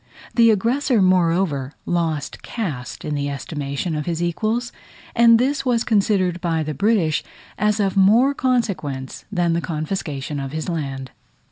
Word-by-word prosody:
The 230 Hz, -1 st, +5 dB
aggressor, 235 Hz, +4 st, +2 dB
moreover, 170 Hz, -6 st, +2 dB
lost 165 Hz, -4 st, -2 dB
caste 155 Hz, -, -5 dB
in 150 Hz, -, -2 dB
the 145 Hz, -1 st, -1 dB
estimation 140 Hz, +2 st, -4 dB
of 150 Hz, +1 st, -3 dB
his 165 Hz, -2 st, -1 dB
equals 215 Hz, +8 st, -1 dB, 0.4 s
and 235 Hz, -1 st, +7 dB
this 270 Hz, +3 st, 0 dB
was 245 Hz, -3 st, +1 dB
considered 195 Hz, -5 st, +1 dB
by 165 Hz, -2 st, 0 dB
the 155 Hz, 0 st, -3 dB
British 170 Hz, -, +1 dB, 0.3 s
as 210 Hz, +1 st, +1 dB
of 195 Hz, -2 st, +1 dB
more 220 Hz, +8 st, +5 dB
consequence 190 Hz, -, -2 dB
than 175 Hz, -4 st, +1 dB
the 170 Hz, -, 0 dB
confiscation 155 Hz, -4 st, -3 dB
of 135 Hz, 0 st, -5 dB
his 155 Hz, 0 st, -3 dB
land. 135 Hz, -6 st, -4 dB
175 Hz, 145 wpm, -21 LUFS, 150-220 Hz, 0.4 s, and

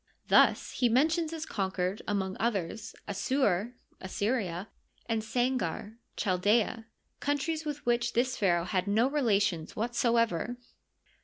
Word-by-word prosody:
Thus -, -, +5 dB
he 245 Hz, -, +2 dB
mentions 315 Hz, +7 st, +2 dB
as 325 Hz, -1 st, -4 dB
con 195 Hz, -3 st, -2 dB
auered, 185 Hz, +2 st, -1 dB
among 190 Hz, -2 st, -1 dB
others, 210 Hz, -2 st, -2 dB
Assur 205 Hz, +1 st, 0 dB, 0.2 s
(Assyria) 195 Hz, -2 st, -2 dB, 0.4 s
and 225 Hz, -1 st, 0 dB
Sangar 230 Hz, -3 st, -1 dB, 0.2 s
(Chal 185 Hz, -3 st, 0 dB
aea), 220 Hz, +3 st, +2 dB, 0.3 s
countries 305 Hz, +3 st, -1 dB
with 295 Hz, -1 st, -5 dB
which 240 Hz, 0 st, +1 dB
this 250 Hz, +2 st, +1 dB
pnaraoh 175 Hz, -4 st, +2 dB
had 185 Hz, +1 st, -1 dB
no 220 Hz, +5 st, +3 dB
relations 205 Hz, -, +1 dB
whatsoever. 230 Hz, -2 st, +1 dB
225 Hz, 125 wpm, -30 LUFS, 195-250 Hz, 0.4 s, Thus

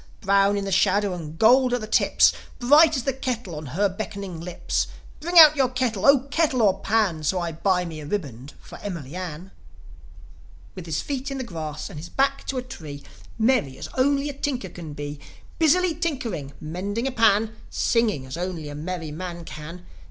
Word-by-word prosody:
Brown 200 Hz, 0 st, +3 dB
in 200 Hz, -, -2 dB
the 195 Hz, -, -3 dB
shadow 195 Hz, +2 st, +2 dB
and 160 Hz, -3 st, -7 dB
gold 250 Hz, +4 st, +5 dB
at 245 Hz, -, -3 dB
the -, -, -4 dB
tips, 215 Hz, -, +4 dB, 0.2 s
Bright 295 Hz, +6 st, +6 dB
as 260 Hz, -, -1 dB
the 270 Hz, -1 st, -1 dB
smile 240 Hz, -8 st, -3 dB
on 150 Hz, +1 st, -6 dB
her 185 Hz, +10 st, +1 dB
beckoning 200 Hz, -3 st, -6 dB
lips. 175 Hz, 0 st, -2 dB, 0.3 s
Bring 345 Hz, +3 st, -1 dB
out 310 Hz, -2 st, +10 dB
your 265 Hz, -3 st, +2 dB
kettle! 250 Hz, -6 st, -1 dB
0 275 Hz, -1 st, +5 dB
kettle 290 Hz, -8 st, +2 dB
or 195 Hz, -3 st, +3 dB
pan! 200 Hz, -7 st, +1 dB
So 180 Hz, +5 st, 0 dB
I 170 Hz, -1 st, -2 dB
buy 180 Hz, +2 st, +1 dB
me 160 Hz, -2 st, -7 dB
a 150 Hz, -, -8 dB
ribband 140 Hz, -, -5 dB
for -, -, -12 dB
Emily 170 Hz, -7 st, -6 dB
Ann." 180 Hz, 0 st, -6 dB, 1.2 s
With 180 Hz, -3 st, -9 dB
his 155 Hz, -2 st, -1 dB
feet 275 Hz, -1 st, -3 dB
in 275 Hz, -, -4 dB
the 260 Hz, -, -3 dB
grass, 155 Hz, -, -6 dB
and 150 Hz, -, -8 dB
his 165 Hz, -, -9 dB
back 275 Hz, 0 st, 0 dB
to 270 Hz, -, -2 dB
a 250 Hz, -, -2 dB
tree, 155 Hz, -, -9 dB, 0.3 s
Merry 225 Hz, -, +1 dB
as -, -, -7 dB
only 275 Hz, +2 st, +2 dB
a 290 Hz, -, -4 dB
tinker 275 Hz, -2 st, -3 dB
can 160 Hz, -4 st, -9 dB
be, 145 Hz, 0 st, -6 dB, 0.4 s
Busily 340 Hz, +2 st, +4 dB
tinkering, 235 Hz, -, -3 dB
mending 195 Hz, +9 st, -4 dB
a 270 Hz, -, 0 dB
pan, 220 Hz, -2 st, +3 dB
Singing 220 Hz, -, +1 dB
as 130 Hz, +4 st, -7 dB
only 175 Hz, -4 st, -4 dB
a -, -, -7 dB
merry 160 Hz, +1 st, -5 dB
man 170 Hz, +1 st, -6 dB
can 160 Hz, +4 st, -9 dB
195 Hz, 195 wpm, -24 LUFS, 165-255 Hz, 1.2 s, out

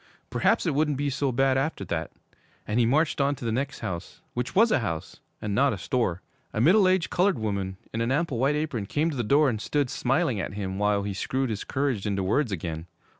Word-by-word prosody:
Perhaps -, -, +2 dB
it 165 Hz, -, +1 dB
wouldn't 150 Hz, -1 st, +1 dB
be 145 Hz, 0 st, -1 dB
so 140 Hz, 0 st, 0 dB
bad 135 Hz, +1 st, +2 dB
after 135 Hz, -8 st, -2 dB
that. 85 Hz, -2 st, -3 dB, 0.6 s
And 105 Hz, +3 st, 0 dB
he 115 Hz, -, +4 dB
marched 150 Hz, +3 st, +2 dB
on 140 Hz, +1 st, +2 dB
to 120 Hz, -, -8 dB
the 115 Hz, -, 0 dB
next 135 Hz, +4 st, -2 dB
house, 90 Hz, 0 st, -6 dB
which 125 Hz, +1 st, -3 dB
was 225 Hz, +3 st, +5 dB
a -, -, +4 dB
house 85 Hz, -9 st, -4 dB, 0.2 s
and 105 Hz, -1 st, -3 dB
not 140 Hz, +6 st, +3 dB
a -, -, -4 dB
store. 115 Hz, -9 st, -1 dB, 0.3 s
A -, -, -1 dB
middle 185 Hz, -, +5 dB
aged 185 Hz, -2 st, +2 dB
colored 185 Hz, +1 st, +2 dB
woman, 100 Hz, -3 st, -2 dB, 0.2 s
in 115 Hz, -, -1 dB
an 115 Hz, +2 st, 0 dB
ample 145 Hz, -3 st, 0 dB
white 140 Hz, +4 st, +2 dB
apron, 145 Hz, -9 st, -2 dB
came 155 Hz, +8 st, 0 dB
to -, -, -5 dB
the 120 Hz, -, -1 dB
door 140 Hz, +7 st, +4 dB
and 110 Hz, -5 st, -1 dB
stood 145 Hz, +1 st, 0 dB
smiling 130 Hz, -, +1 dB
at 95 Hz, +1 st, -4 dB
him 95 Hz, -1 st, -3 dB
while 105 Hz, -1 st, +2 dB
he 100 Hz, 0 st, -3 dB
screwed 130 Hz, +6 st, -1 dB
his 105 Hz, -, -3 dB
courage 130 Hz, -7 st, -1 dB
into 100 Hz, -2 st, 0 dB
words 110 Hz, +6 st, +1 dB
again. 80 Hz, -2 st, -4 dB
125 Hz, 230 wpm, -26 LUFS, 100-145 Hz, 0.6 s, was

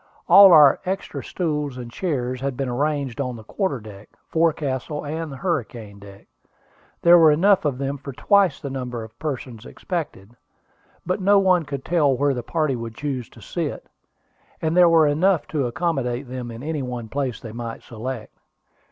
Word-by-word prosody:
All 195 Hz, -1 st, +9 dB
our 150 Hz, -4 st, +7 dB
extra 190 Hz, +2 st, -4 dB
stools 150 Hz, -6 st, -3 dB
and 120 Hz, -2 st, -8 dB
chairs 130 Hz, -6 st, -3 dB
had 135 Hz, -2 st, -3 dB
been 135 Hz, -, -2 dB
arranged 140 Hz, 0 st, -1 dB
on 125 Hz, -2 st, -3 dB
the 110 Hz, -, -10 dB
quarter 145 Hz, -, -2 dB
deck, 105 Hz, -1 st, -12 dB, 0.2 s
forecastle, 150 Hz, -3 st, -1 dB
and 160 Hz, +1 st, -4 dB
hurricane 125 Hz, -, -4 dB
deck. 100 Hz, -1 st, -14 dB, 0.8 s
There 175 Hz, 0 st, +8 dB
were 160 Hz, -1 st, +7 dB
enough 180 Hz, +5 st, +3 dB
of 140 Hz, -4 st, 0 dB
them 140 Hz, +1 st, -3 dB
for 140 Hz, 0 st, -7 dB
twice 195 Hz, +3 st, +2 dB
the 140 Hz, -, -6 dB
number 125 Hz, -3 st, -5 dB
of 110 Hz, +1 st, -14 dB
persons 125 Hz, -6 st, -5 dB
expected, 145 Hz, -, -6 dB, 0.7 s
but 185 Hz, +3 st, -1 dB
no 200 Hz, +2 st, +5 dB
one 185 Hz, -4 st, +3 dB
could 140 Hz, -2 st, -6 dB
tell 150 Hz, -6 st, +2 dB
where 140 Hz, +1 st, +2 dB
the 125 Hz, -, -3 dB
party 155 Hz, +1 st, -1 dB
would 115 Hz, -1 st, -7 dB
choose 135 Hz, -4 st, -4 dB
to -, -, -16 dB
sit, -, -, -4 dB, 0.7 s
and 160 Hz, +1 st, -1 dB
there 180 Hz, -1 st, +6 dB
were 165 Hz, -2 st, +5 dB
enough 160 Hz, +4 st, +2 dB
to 140 Hz, -5 st, -1 dB
accommodate 130 Hz, -3 st, -2 dB
them 125 Hz, -1 st, -6 dB
in 115 Hz, +2 st, -9 dB
any 155 Hz, -1 st, -3 dB
one 125 Hz, -3 st, -5 dB
place 130 Hz, -2 st, -3 dB
they 115 Hz, -, -9 dB
might 115 Hz, 0 st, -7 dB
select. 115 Hz, 0 st, -7 dB
140 Hz, 175 wpm, -22 LUFS, 120-160 Hz, 0.8 s, All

